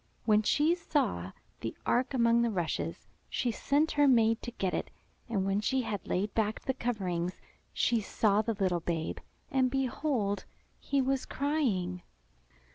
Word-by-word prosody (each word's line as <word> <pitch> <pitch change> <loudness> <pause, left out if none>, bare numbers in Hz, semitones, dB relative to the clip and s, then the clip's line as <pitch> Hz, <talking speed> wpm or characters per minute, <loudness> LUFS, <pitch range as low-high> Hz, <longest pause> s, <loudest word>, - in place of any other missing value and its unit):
When 215 -1 +5
she 295 +9 +3
saw 280 - -1 0.3
the 115 - -5
ark 255 +3 +1
among 235 -1 +4
the 235 - +2
rushes, 175 -6 -2 0.2
she 245 - 0
sent 290 +7 +1
her 290 -1 +4
maid 230 -3 +4
to - - -5
get 190 -6 -2
it. - - -2 0.4
And 200 -4 0
when 195 +1 +1
she 260 +4 +1
had 205 -4 -4
laid 200 +3 -1
back 220 -1 0
the 265 - -1
coverings, 185 -8 -2 0.3
she 235 -2 +2
saw 210 0 +2
the 225 0 -2
little 185 -3 +1
babe, 165 -1 -2 0.3
and 260 -1 +3
behold! 255 -5 -1 0.3
he 275 -1 +1
was 265 0 0
crying. 225 - 0
225 Hz, 155 wpm, -31 LUFS, 195-265 Hz, 0.4 s, When